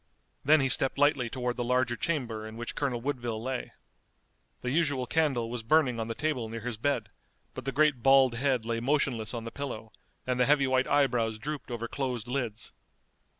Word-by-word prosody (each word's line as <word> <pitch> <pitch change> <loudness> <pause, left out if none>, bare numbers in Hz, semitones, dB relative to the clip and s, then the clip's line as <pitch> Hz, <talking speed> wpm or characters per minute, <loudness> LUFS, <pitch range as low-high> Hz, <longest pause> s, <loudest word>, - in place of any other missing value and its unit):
Then 155 +1 +5
he 135 - +2
stepped 135 +1 +3
lightly 140 -4 +3
toward 125 0 -3
the 120 - -1
larger 125 0 +1
chamber 120 -7 -2
in 110 +1 -9
which 120 0 -4
Colonel 130 -5 -2
Woodville 120 -4 -3
lay. 130 +2 -4 0.9
The 125 - -2
usual 145 -4 +1
candle 135 -5 +1
was 120 0 -4
burning 125 0 +2
on 110 - -2
the 115 - -4
table 130 -7 -1
near 115 0 -6
his 120 +1 -3
bed, 115 -4 -1 0.4
but - - -8
the 135 - -1
great 145 -3 +2
bald 135 -1 +5
head 125 -1 0
lay 115 0 -1
motionless 125 -4 0
on 115 - -4
the 115 - -6
pillow, 120 -6 -6 0.3
and 125 -1 -1
the 125 - +4
heavy 145 -1 +4
white 130 0 +2
eyebrows 120 -6 +2
drooped 145 +5 -6
over 115 -1 -4
closed 125 -3 -3
lids. 120 -5 -3
125 Hz, 195 wpm, -29 LUFS, 115-140 Hz, 0.9 s, Then